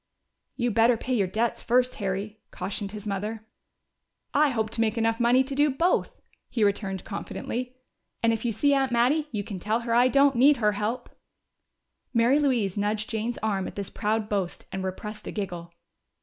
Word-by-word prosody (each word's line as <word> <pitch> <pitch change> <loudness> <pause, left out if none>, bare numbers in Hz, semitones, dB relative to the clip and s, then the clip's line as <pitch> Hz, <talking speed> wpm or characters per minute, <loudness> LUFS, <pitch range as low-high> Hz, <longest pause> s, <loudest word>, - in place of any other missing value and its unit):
"You 240 -1 0
better 230 +2 +4
pay 255 - -3
your 200 -6 +2
debts 225 +5 -1
first, 250 +1 +2
Harry," 200 +2 -3
cautioned 195 +2 -4
his 210 -1 -8
mother. 210 +2 -3 0.9
"I 295 +1 +4
hope 220 -4 -1
to 230 - -1
make 225 +1 +1
enough 225 0 +1
money 245 +2 +4
to 270 +1 -6
do 290 +2 +3
both," 330 +7 0 0.3
he 230 - 0
returned 200 -2 0
confidently. 245 +4 -5 0.5
"And 230 0 +4
if 225 - -3
you 240 - 0
see 285 +7 +2
Aunt 270 -2 +2
Mattie, 260 +6 +2
you 210 -3 -2
can 195 -2 -6
tell 215 +5 0
her 235 0 -2
I 245 +2 +5
don't 275 +1 +4
need 275 +4 +6
her 210 -3 +2
help!" 210 +4 -3 1.0
Mary 240 +5 +4
Louise 235 -10 +1
nudged 210 +1 -1
Jane's 225 +2 -2
arm 200 -3 0
at - - -8
this 200 -1 -5
proud 215 0 -1
boast 195 -4 -2
and 190 0 -4
repressed 210 +3 -6
a - - -3
giggle. 175 -5 -5
225 Hz, 185 wpm, -26 LUFS, 205-245 Hz, 1.0 s, need